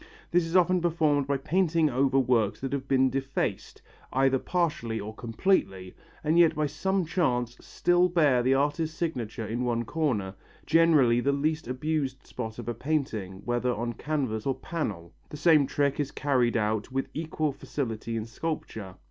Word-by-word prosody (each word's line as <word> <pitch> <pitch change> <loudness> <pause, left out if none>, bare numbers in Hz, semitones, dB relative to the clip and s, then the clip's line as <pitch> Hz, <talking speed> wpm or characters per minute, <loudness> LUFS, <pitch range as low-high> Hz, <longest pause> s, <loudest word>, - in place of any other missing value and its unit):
This 175 -1 +2
is 165 - -4
often 180 0 +4
performed 155 -5 +1
by 140 0 +1
painting 165 +2 +2
over 135 0 +2
works 120 -6 +2
that 135 +1 -3
have 135 -1 -3
been 130 -1 +3
defaced, 135 +1 -3 0.3
either 135 0 +2
partially 150 -11 -1
or 105 +1 -6
completely, 110 - -1 0.3
and 155 +3 +3
yet 165 -2 +5
by 155 0 +1
some 190 +5 -1
chance 125 -9 0
still 175 +1 +2
bear 150 -8 +3
the 130 +2 +3
artist's 150 +3 0
signature 120 -9 -3
in 115 +4 -2
one 120 -1 0
corner 110 -10 -1 0.3
generally 155 -7 +4
the 140 +3 +1
least 155 +3 -1
abused 135 0 -2
spot 110 -3 -6
of 120 - -7
a 120 - -1
painting 110 -9 -3
whether 120 +1 0
on 120 0 -3
canvas 130 -4 -2
or 135 - +1
panel. 100 - -5 0.2
The 150 - -7
same 150 -2 +4
trick 140 0 0
is 145 -2 0
carried 130 -6 +1
out 110 +2 -1
with 135 +1 -1
equal 155 -1 -2
facility 115 -5 -4
in 110 - -3
sculpture. 110 - -5
135 Hz, 165 wpm, -27 LUFS, 120-155 Hz, 0.3 s, yet